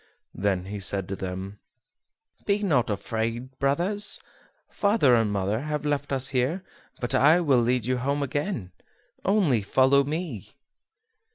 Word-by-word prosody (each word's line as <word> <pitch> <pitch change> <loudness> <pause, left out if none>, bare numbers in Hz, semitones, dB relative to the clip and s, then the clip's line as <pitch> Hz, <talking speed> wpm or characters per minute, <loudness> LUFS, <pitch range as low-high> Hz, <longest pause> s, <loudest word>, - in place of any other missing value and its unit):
Then 95 -1 -1
he 100 +1 -5
said 95 -1 -1
to 100 - -2
them: 95 +2 -6 0.9
"Be 205 0 +1
not 140 - +2
afraid, 115 +5 -3
brothers; 180 +10 +1 0.5
father 200 - +3
and 115 -3 +3
mother 100 +2 0
have 150 +2 -3
left 145 -1 -1
us 135 0 0
here, 140 +8 0 0.4
but 120 +2 -3
I 150 +6 +5
will 140 -8 +3
lead 120 -1 +1
you 130 +1 0
home 140 +3 -1
again, 140 - -3 0.5
only 185 - +2
follow 130 +6 +4
me." 140 - -5
130 Hz, 140 wpm, -26 LUFS, 105-150 Hz, 0.9 s, I